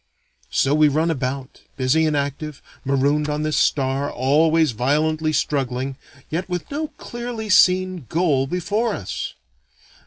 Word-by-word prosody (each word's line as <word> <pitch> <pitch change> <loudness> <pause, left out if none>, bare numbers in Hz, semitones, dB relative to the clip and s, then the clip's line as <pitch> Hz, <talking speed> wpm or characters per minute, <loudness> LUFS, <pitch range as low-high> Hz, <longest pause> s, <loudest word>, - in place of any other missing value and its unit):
So 140 - +2
we 155 0 +5
run 155 +3 +1
about, 130 -2 -4 0.2
busy 145 +5 +2
and 150 -1 +1
active, 145 +1 -4 0.2
marooned 140 +2 +1
on 150 +1 -1
this 155 -1 0
star, 135 0 +1
always 155 +4 +3
violently 155 +6 +1
struggling, 135 -3 -1 0.4
yet 175 +4 -2
with 180 - -4
no 305 +2 -2
clearly 235 -2 -6
seen 185 - +3
goal 150 -6 +1
before 205 - -1
us. 95 - -5
150 Hz, 130 wpm, -22 LUFS, 135-170 Hz, 0.4 s, we